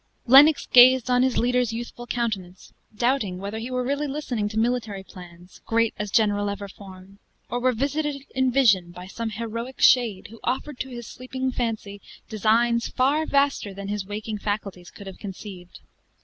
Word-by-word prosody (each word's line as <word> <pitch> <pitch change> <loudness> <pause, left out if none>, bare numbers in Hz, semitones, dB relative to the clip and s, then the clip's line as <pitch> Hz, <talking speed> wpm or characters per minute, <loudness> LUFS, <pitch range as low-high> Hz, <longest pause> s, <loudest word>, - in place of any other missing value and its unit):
Lennox 280 +4 +7
gazed 255 0 +6
on 250 0 +4
his 255 -1 +1
leader's 245 -1 +1
youthful 240 +1 -7
countenance, 200 -7 -4 0.2
doubting 235 -6 0
whether 200 +4 -5
he 235 +3 -6
really 265 +4 -1
were - - -5
listening 245 -8 -2
to 215 - -6
military 225 -4 -1
plans, 180 -1 -14
great 230 0 +2
as 210 0 -3
general 205 -1 +2
ever 200 0 -5
formed; 195 0 -14 0.3
or 245 - -1
were 255 +1 +2
visited, 280 +3 -2
in 260 -1 +1
vision, 210 -10 +3
by 180 +1 -10
some 225 +4 -5
heroic 230 +4 -6
shade, 225 -5 +3
who 230 - -12
offered 260 +2 -3
to 265 - -4
his 240 -2 -8
sleeping 260 +2 -4
fancy 220 -5 -4 0.3
designs 230 +2 +2
far 285 +5 +1
vaster 280 -8 +1
than 200 0 -7
his 205 -1 -2
waking 210 +2 -5
faculties 200 -4 -4
could 200 - -13
have 190 -1 -10
conceived. 190 -3 -9
230 Hz, 170 wpm, -24 LUFS, 200-255 Hz, 0.3 s, Lennox